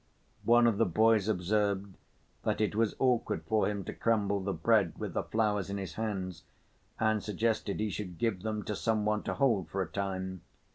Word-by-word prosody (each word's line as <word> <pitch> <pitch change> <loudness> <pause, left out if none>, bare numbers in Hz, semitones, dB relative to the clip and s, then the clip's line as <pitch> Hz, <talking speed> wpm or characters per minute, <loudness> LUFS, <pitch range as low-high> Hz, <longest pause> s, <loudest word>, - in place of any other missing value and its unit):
One 120 0 +6
of 115 -4 +2
the - - +4
boys 110 +3 +3
observed 100 0 0 0.5
that - - -1
it 110 -1 +1
was 110 -1 +1
awkward 120 -10 +1
for 110 +5 +2
him 100 -2 -3
to - - -6
crumble 100 -3 +1
the 100 +1 -2
bread 95 +1 +2
with - - -4
the - - 0
flowers 105 -3 0
in 100 - -3
his 95 -5 -5
hands 95 -6 -3 0.6
and 110 -1 +2
suggested 105 0 -1
he 105 -1 0
should 90 -5 -5
give 100 -1 0
them 105 0 -3
to 105 - -3
some 110 0 0
one 105 0 +1
to - - -3
hold 115 - +2
for 95 - -3
a - - -7
time. 95 -2 -3
105 Hz, 195 wpm, -31 LUFS, 95-110 Hz, 0.6 s, One